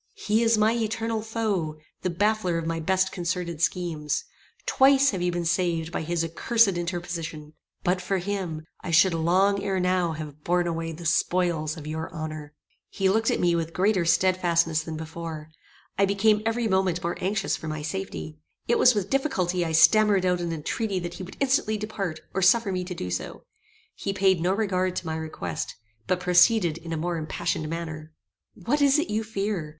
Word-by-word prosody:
"He 220 - +1
is 230 -1 +4
my 215 +1 +3
eternal 225 -1 -1
foe; 210 -8 -2 0.2
the 185 - -1
baffler 195 -1 +1
of 165 - -3
my 165 0 -2
best 190 +3 +1
concerted 170 -2 -3
schemes. 165 -4 -1 0.4
Twice 275 +1 +5
have 190 -4 -3
you 180 0 +1
been 175 0 -2
saved 165 -2 0
by - - -2
his 170 +1 -1
accursed 225 +7 +3
interposition. 170 -4 -4 0.3
But 180 +1 +1
for 190 +2 -1
him 180 -4 -3 0.2
I - - -5
should 170 +2 +5
long 185 +5 +2
ere 190 -2 0
now 180 -2 +1
have 150 -1 -8
borne 175 0 +1
away 165 -1 -2
the 165 +2 -9
spoils 165 -2 +1
of 150 - -9
your 160 +1 -4
honor." 155 -2 -6 0.3
He 195 -1 0
looked 225 +2 +2
at - - 0
me 175 -1 +3
with 165 -1 -2
greater 190 -1 +2
stedfastness 170 -2 +2
than 160 -1 -6
before. 160 -1 -7 0.5
I 200 - +6
became 210 +2 +3
every 225 0 0
moment 190 -3 +1
more 170 +1 -1
anxious 195 +3 0
for 160 - -8
my 155 -1 -4
safety. 80 - -5 0.3
It 235 - +2
was 250 -2 +6
with 200 -2 -2
difficulty 185 - 0
I 165 - -2
stammered 190 +5 +5
out 180 -1 +1
an 170 -1 -2
entreaty 190 +6 -2
that 175 -1 -4
he - - -8
would 185 0 -9
instantly 260 -6 +1
depart, 195 -6 -4
or 190 - -1
suffer 200 +2 +4
me 180 -1 -2
to 180 0 -6
do 90 - -5
so. 90 - -4 0.5
He 195 - -4
paid 190 -3 +3
no 180 +2 +2
regard 185 -4 0
to 185 - -4
my 160 0 -2
request, 155 - -5 0.3
but 185 - +1
proceeded 180 -1 +4
in 165 0 -8
a 165 - -1
more 170 +2 -2
impassioned 155 0 -2
manner. 160 -2 -6 0.4
"What 290 +6 -1
is 280 0 +5
it 310 +4 -1
you 215 +1 0
fear? 200 -6 -3
180 Hz, 190 wpm, -26 LUFS, 165-200 Hz, 0.5 s, I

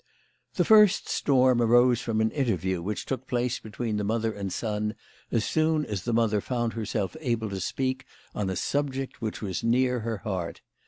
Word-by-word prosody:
The - - +2
first 210 -3 +6
storm 130 -3 +3
arose 120 +1 +4
from 110 -3 0
an 110 0 +2
interview 95 - -1
which 105 +5 -3
took 130 -1 -4
place 125 -1 -1
between 110 0 -4
the 105 - -1
mother 110 +1 0
and 100 -2 -4
son 105 0 -2 0.4
as 115 -2 +1
soon 155 -1 +1
as 100 -4 -4
the 120 - 0
mother 110 -3 +2
found 120 -1 -2
herself 110 0 -2
able 115 -7 -1
to 95 -1 -4
speak 130 +6 -2 0.3
on 100 -2 -2
a 95 - -2
subject 135 +4 -2
which 110 -1 -4
was 95 -3 -3
near 125 +2 +2
her 115 0 -3
heart. 95 -5 -4
115 Hz, 180 wpm, -27 LUFS, 105-130 Hz, 0.4 s, first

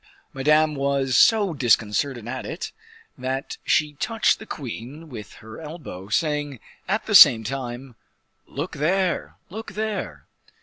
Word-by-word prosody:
Madame 150 +3 +3
was 135 -2 0
so 210 -6 +5
disconcerted 120 -1 +1
at 130 +1 -4
it, 165 - -6 0.5
that 130 +1 -4
she 150 -1 +2
touched 225 - +1
the 220 - -11
queen 140 +4 -7
with 110 -6 -9
her 110 +6 -11
elbow, 150 - -8
saying 145 -1 -1 0.3
at - - -1
the - - -3
same 110 -1 +9
time, 125 +1 -5 0.5
"Look 145 +6 -5
there, 180 +4 0 0.2
look 215 0 -7
there." 215 0 -4
140 Hz, 130 wpm, -23 LUFS, 125-165 Hz, 0.5 s, same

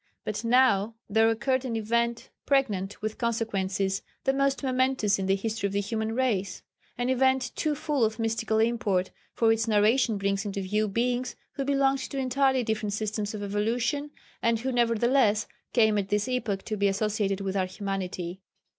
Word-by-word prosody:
] - - -53
But - - -3
now 230 -3 +3
there 220 +2 +4
occurred 260 +3 0
an 245 -3 -3
event 235 +2 -1 0.2
pregnant 210 -9 0
with 215 +2 -3
consequences 200 -5 -1 0.2
the 270 - +2
most 275 +1 +1
momentous 255 -6 +1
in 190 - -2
the 195 - +3
history 215 +1 -2
of 195 - -6
the 200 - +1
human 220 +2 -2
race. 205 -7 -1 0.3
An 245 +1 -1
event 260 -1 +2
too 305 -2 0
full 290 -3 0
of 220 0 +1
mystical 225 -1 0
import, 220 -5 +1 0.2
for 225 -1 +4
its 225 0 -1
narration 220 +2 +3
brings 195 0 0
into 200 -1 -3
view 210 +3 0
Beings 245 +4 -1 0.2
who 275 - -3
belonged 275 0 +2
to 275 - -5
entirely 265 0 +2
different 215 -2 -2
systems 210 0 -2
of 205 - -5
evolution, 230 +8 -1 0.3
and 230 -1 +1
who 260 +2 -1
nevertheless 235 -2 +2 0.3
came 220 -3 +3
at 195 -1 -3
this 210 +3 +1
epoch 230 -6 -2
to 215 - -3
be 200 0 +2
associated 200 0 0
with 195 0 -3
our 190 -1 +1
humanity. 185 -2 -4
225 Hz, 175 wpm, -27 LUFS, 200-250 Hz, 0.3 s, there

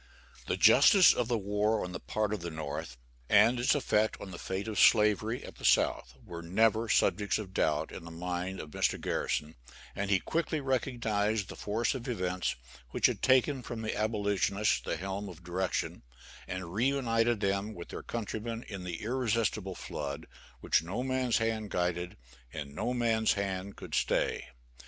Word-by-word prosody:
The - - 0
justice 195 -4 +7
of 125 - -1
the 120 -1 +1
war 105 +2 0
on 90 - -7
the - - -5
part 110 -1 -1
of 105 - -2
the 85 0 -5
North, 75 -6 -5 0.3
and 110 +4 +5
its 120 - +3
effect 110 -6 +1
on 95 - -8
the 85 - -8
fate 95 +3 -4
of 110 -2 -2
Slavery 105 +2 +4
at - - -11
the - - -14
South, 65 +1 +2
were 85 -1 -7
never 110 +6 +2
subjects 105 -2 +2
of 100 -4 -7
doubt - - 0
in - - -8
the 85 - -9
mind 90 +2 -4
of 75 - -8
Mr. - - 0
Garrison, 75 +1 -2 0.4
and 100 0 -2
he 100 -2 +4
quickly 165 - -1
recognized 110 -6 0
the - - -7
force 110 +6 -1
of 130 -2 -6
events 90 -6 -1 0.3
which - - 0
had - - +2
taken 130 +1 +3
from 115 -1 -6
the 110 - -2
abolitionists 105 -1 +1
the - - -3
helm 95 +3 -4
of 90 -1 -12
direction, 90 +1 -2 0.5
and 95 -2 -5
reunited 120 -1 +1
them 100 +1 -1
with 85 - -9
their - - -6
countrymen 115 0 -4
in 100 -3 -6
the 90 0 -5
irresistible 110 -5 -1
flood 70 +2 -5 0.4
which - - +3
no 95 +10 -3
man's 130 -2 +1
hand 110 -2 -1
guided, 90 -1 -2 0.3
and 70 -1 -6
no 115 +11 -2
man's 115 -3 +2
hand 100 -1 -3
could - - -10
stay. - - 0
105 Hz, 175 wpm, -31 LUFS, 90-115 Hz, 0.5 s, justice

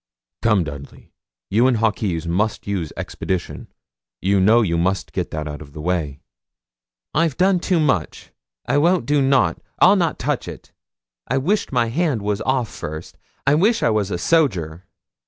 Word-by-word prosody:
'Come, 105 -5 +3
Dudley, 70 -2 -10 0.4
you 115 +5 +4
and 125 -3 +2
Hawkes 105 -6 0
must 100 +6 -1
use 95 -6 -3
expedition. 90 -2 -4 0.5
You 100 +5 +2
know 110 +5 +5
you 85 -5 0
must 90 +2 -1
get - - -2
that 75 0 -4
out 75 0 -7
of 70 -2 -12
the 75 - -9
way.' 75 -4 -2 0.9
'I've 160 -3 +1
done 185 0 +3
too 175 0 +1
much. 135 - -1 0.3
I 145 - +2
won't 170 -3 +2
do 145 +2 +2
nout; 135 -11 +2 0.2
I'll - - +6
not - - 0
touch - - -2
it. - - -10 0.6
I 130 - 0
wish 185 +11 0
my 120 -3 +1
hand 140 - 0
was 105 0 -1
off 130 -3 0
first; 80 +2 -7 0.3
I 135 - +4
wish 210 +9 +2
I - - +3
was 105 -2 0
a 95 - -2
soger. 90 - +1
105 Hz, 170 wpm, -21 LUFS, 85-135 Hz, 0.9 s, I'll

